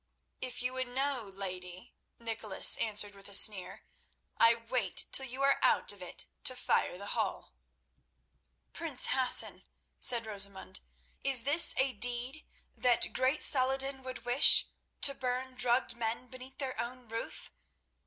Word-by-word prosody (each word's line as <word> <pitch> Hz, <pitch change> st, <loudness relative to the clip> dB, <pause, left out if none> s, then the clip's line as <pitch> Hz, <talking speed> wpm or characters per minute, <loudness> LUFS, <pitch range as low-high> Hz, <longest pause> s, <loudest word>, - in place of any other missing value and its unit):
"If 250 Hz, -1 st, -6 dB
you 250 Hz, +1 st, -3 dB
would 260 Hz, 0 st, -4 dB
know, 260 Hz, -3 st, -4 dB
lady," 185 Hz, +2 st, -7 dB, 0.2 s
Nicholas 225 Hz, -4 st, +3 dB
answered 210 Hz, -2 st, -1 dB
with 195 Hz, 0 st, -15 dB
a 200 Hz, -, +1 dB
sneer, 200 Hz, -3 st, +4 dB, 0.5 s
"I 230 Hz, 0 st, +4 dB
wait 230 Hz, -4 st, -1 dB
till 265 Hz, -, +5 dB
you 260 Hz, +2 st, -6 dB
are 275 Hz, 0 st, +1 dB
out -, -, +1 dB
of 200 Hz, -, -17 dB
it 180 Hz, -, -4 dB, 0.2 s
to 255 Hz, -3 st, +2 dB
fire 215 Hz, -7 st, -2 dB
the 200 Hz, +2 st, -7 dB
hall." -, -, -5 dB, 1.2 s
"Prince -, -, +1 dB
Hassan," -, -, 0 dB, 0.4 s
said 235 Hz, -2 st, +1 dB
Rosamund, 200 Hz, -, -4 dB, 0.4 s
"is 270 Hz, -4 st, +4 dB
this 295 Hz, +5 st, +6 dB
a 265 Hz, 0 st, 0 dB
deed 245 Hz, +6 st, -1 dB, 0.3 s
that 245 Hz, -2 st, +1 dB
great 260 Hz, +4 st, 0 dB
Saladin 270 Hz, 0 st, +2 dB
would 255 Hz, -1 st, -10 dB
wish, 245 Hz, +3 st, +6 dB, 0.4 s
to 275 Hz, -, +3 dB
burn 255 Hz, 0 st, -5 dB
drugged 250 Hz, -1 st, +1 dB
men 235 Hz, +1 st, -5 dB
beneath 255 Hz, +1 st, -13 dB
their 265 Hz, -4 st, -5 dB
own 245 Hz, +1 st, -8 dB
roof? 230 Hz, +1 st, -8 dB
245 Hz, 145 wpm, -30 LUFS, 215-260 Hz, 1.2 s, this